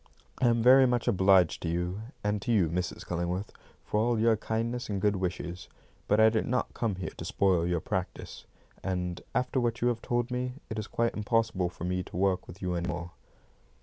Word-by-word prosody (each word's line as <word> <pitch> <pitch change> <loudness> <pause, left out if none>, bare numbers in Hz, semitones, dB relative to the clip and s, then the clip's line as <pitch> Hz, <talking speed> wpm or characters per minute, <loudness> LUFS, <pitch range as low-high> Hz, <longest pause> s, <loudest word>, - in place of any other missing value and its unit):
"I 125 - +5
am 115 -1 +3
very 130 +2 +8
much 120 -1 0
obliged 95 -5 +4
to 85 - -2
you, 90 +4 -2 0.2
and 105 0 0
to 120 - -1
you, 95 -8 +3
Mrs. 90 +1 -3
Cullingworth, 90 +3 -2 0.3
for 105 - 0
all 115 +1 +2
your 115 0 +4
kindness 115 +3 -2
and 100 -2 -1
good 105 +1 +2
wishes, 90 -1 -4 0.4
but 105 - +3
I 110 0 +7
did 110 0 0
not 125 +1 -1
come 110 -5 -1
here 90 -3 -5
to - - -7
spoil 90 -4 +2
your 85 -2 0
practice; 95 0 -5 0.4
and, 90 -2 -2
after 125 +1 +1
what 120 -1 0
you 120 - +2
have 115 -1 -2
told 120 0 -1
me, 125 0 -2 0.2
it 110 - -2
is 110 - -5
quite 115 0 0
impossible 105 -4 +1
for 90 - -10
me 90 +1 -1
to 90 - -8
work 95 -1 +1
with 95 +3 -11
you 90 -1 -1
any 85 0 -2
more." 85 0 -4
100 Hz, 210 wpm, -29 LUFS, 90-115 Hz, 0.4 s, very